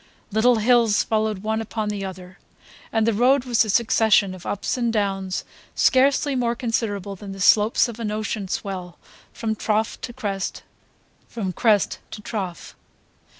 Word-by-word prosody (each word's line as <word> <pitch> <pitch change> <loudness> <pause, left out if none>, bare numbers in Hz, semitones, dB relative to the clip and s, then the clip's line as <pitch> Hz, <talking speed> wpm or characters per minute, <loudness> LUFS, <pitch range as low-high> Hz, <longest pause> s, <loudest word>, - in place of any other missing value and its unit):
Little 230 +4 +4
hills 230 -1 +3
followed 215 -2 -1
one 220 +1 -1
upon 220 -1 -3
the 205 -1 -3
other, 185 0 -8 0.5
and 225 -1 +2
the 230 - +2
road 250 +5 +3
was 240 -3 +3
a 215 - -5
succession 215 -3 +3
of 185 -2 -10
ups 205 - -2
and 240 -2 0
downs 195 -3 -1 0.3
scarcely 275 +2 +3
more 240 -2 0
considerable 225 -5 -2
than 195 +1 -8
the 195 - -10
slopes 210 +5 +4
of 235 -1 -8
an 225 -2 -2
ocean 215 -1 -3
swell, 185 -3 -5 0.3
from 220 -1 -3
trough 215 +1 -1
to 240 - -5
crest, 205 -6 -4 0.6
from 195 -5 -4
crest 215 0 +2
to - - -8
trough. 190 -7 -5
215 Hz, 155 wpm, -23 LUFS, 195-230 Hz, 0.6 s, Little